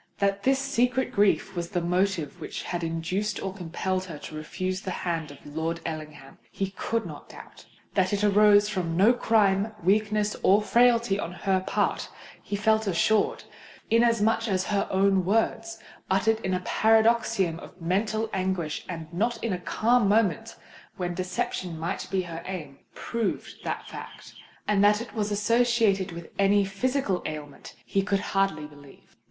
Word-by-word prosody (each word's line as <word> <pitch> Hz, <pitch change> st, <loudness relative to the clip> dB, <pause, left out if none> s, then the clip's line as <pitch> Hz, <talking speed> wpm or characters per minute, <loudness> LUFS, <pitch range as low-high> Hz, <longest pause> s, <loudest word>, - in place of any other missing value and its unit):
That 200 Hz, 0 st, +1 dB
this 270 Hz, +5 st, +3 dB
secret 250 Hz, -1 st, 0 dB
grief 205 Hz, -4 st, +2 dB
was 170 Hz, -1 st, -3 dB
the 180 Hz, -, -1 dB
motive 175 Hz, -2 st, -1 dB
which -, -, -5 dB
had 175 Hz, -1 st, -3 dB
induced 180 Hz, +6 st, -2 dB
or 190 Hz, -1 st, -4 dB
compelled 185 Hz, +1 st, -3 dB
her 165 Hz, -5 st, -8 dB
to 150 Hz, -, -10 dB
refuse 185 Hz, +5 st, -3 dB
the 190 Hz, -, -5 dB, 0.2 s
hand 165 Hz, -3 st, -2 dB
of 145 Hz, -1 st, -14 dB
Lord 160 Hz, +3 st, -3 dB
Ellingham, 155 Hz, -4 st, -7 dB
he 195 Hz, +9 st, -3 dB
could 225 Hz, +3 st, -2 dB
not -, -, -9 dB
doubt:—that 190 Hz, -2 st, -5 dB
it 205 Hz, 0 st, 0 dB
arose 205 Hz, 0 st, +5 dB
from 175 Hz, -5 st, -2 dB
no 210 Hz, +6 st, +6 dB
crime—weakness—nor 210 Hz, -1 st, +2 dB
frailty 235 Hz, -3 st, +3 dB
on 170 Hz, -, -3 dB
her 190 Hz, 0 st, 0 dB
part, -, -, 0 dB, 0.3 s
he 205 Hz, -, -4 dB
felt 220 Hz, +1 st, +2 dB
assured; 205 Hz, +4 st, +2 dB, 0.5 s
inasmuch 230 Hz, -1 st, +3 dB
as 190 Hz, -3 st, +1 dB
her 200 Hz, 0 st, 0 dB
own 195 Hz, 0 st, +3 dB
words, 225 Hz, +3 st, 0 dB, 0.3 s
uttered 220 Hz, +4 st, +2 dB
in 190 Hz, -4 st, -1 dB
a 180 Hz, -, -3 dB
paroxysm 220 Hz, -6 st, +3 dB
of -, -, -13 dB
mental 215 Hz, +6 st, 0 dB
anguish 185 Hz, -5 st, -2 dB
and 165 Hz, -3 st, -5 dB
not 230 Hz, +6 st, 0 dB
in 230 Hz, -4 st, 0 dB
a 180 Hz, -, -3 dB
calm 225 Hz, +3 st, +2 dB
moment 225 Hz, +1 st, +1 dB, 0.4 s
when 180 Hz, -1 st, -2 dB
deception 180 Hz, -1 st, -3 dB
might 165 Hz, +2 st, -3 dB
be 190 Hz, -1 st, 0 dB
her 170 Hz, -1 st, -7 dB
aim, 155 Hz, -7 st, -6 dB, 0.2 s
proved 230 Hz, -2 st, -3 dB
that -, -, -4 dB
fact;—and 205 Hz, -1 st, -4 dB
that 210 Hz, +1 st, +5 dB
it 235 Hz, -, -8 dB
was 210 Hz, -2 st, -1 dB
associated 215 Hz, -2 st, +2 dB
with 170 Hz, -1 st, -9 dB
any 200 Hz, 0 st, +4 dB
physical 200 Hz, 0 st, -1 dB
ailment, 150 Hz, -2 st, -8 dB
he 195 Hz, -, +1 dB
could 195 Hz, 0 st, 0 dB
hardly 195 Hz, -6 st, +1 dB
believe. 145 Hz, -2 st, -16 dB
195 Hz, 155 wpm, -26 LUFS, 175-220 Hz, 0.5 s, no